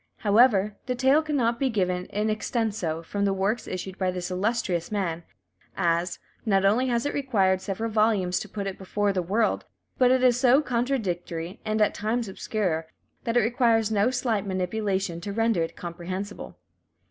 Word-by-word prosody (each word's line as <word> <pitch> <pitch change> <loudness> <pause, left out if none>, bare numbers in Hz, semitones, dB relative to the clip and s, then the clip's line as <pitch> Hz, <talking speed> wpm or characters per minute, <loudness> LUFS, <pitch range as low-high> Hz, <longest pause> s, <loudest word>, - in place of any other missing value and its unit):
However, 210 -2 +4
the 250 - 0
tale 265 +4 +4
cannot 255 -7 0
be 270 - +2
given 180 -5 -1
in 210 +1 -1
extenso 210 -7 -2
from 200 +4 -3
the 195 -1 +2
works 200 +5 -1
issued 185 +1 -5
by 185 -1 +1
this 180 0 -4
illustrious 185 -3 -1
man, 180 -5 -1 0.6
as, 170 +1 +1 0.3
not 195 -4 +2
only 230 +6 +3
has 235 0 0
it 290 - -1
required 195 -9 +1
several 220 +4 -3
volumes 210 -4 +2
to - - -7
put 200 -2 -4
it 195 -1 -5
before 200 +1 0
the 185 - 0
world, 210 +6 0 0.4
but 250 -1 +5
it 255 0 +3
is 245 -1 +4
so 260 +1 +5
contradictory, 205 - -2
and 215 0 +2
at - - +1
times 225 +2 -1
obscure, 185 -5 -2 0.4
that 230 +1 +1
it - - +6
requires 225 -1 +2
no 210 +2 +3
slight 235 -5 0
manipulation 190 -2 -1
to 200 - -5
render 225 -3 +1
it 165 - -3
comprehensible. 185 +4 -6
205 Hz, 170 wpm, -26 LUFS, 185-235 Hz, 0.6 s, it